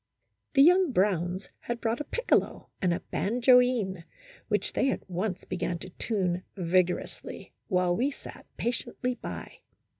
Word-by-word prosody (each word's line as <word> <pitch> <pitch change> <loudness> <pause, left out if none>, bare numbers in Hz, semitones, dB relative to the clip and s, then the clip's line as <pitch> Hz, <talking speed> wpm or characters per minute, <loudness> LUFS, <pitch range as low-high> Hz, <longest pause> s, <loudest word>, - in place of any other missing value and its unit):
The 275 - +8
young 360 0 +5
Browns 185 -3 +1
had 235 0 -4
brought 230 +1 -1
a - - -2
piccolo 485 - 0
and 185 -3 +2
a 170 - -1
banjoine, 240 -5 +3 0.4
which - - 0
they 270 - +2
at - - -3
once 185 +1 -2
began 175 0 -2
to 185 +2 -10
tune 185 -4 -1 0.2
vigor 180 0 +2
ously, - - -10 0.2
while 180 -1 +2
we 255 +7 +1
sat 290 - -11
patiently 245 +1 -2
by. - - -8
205 Hz, 145 wpm, -28 LUFS, 180-250 Hz, 0.4 s, The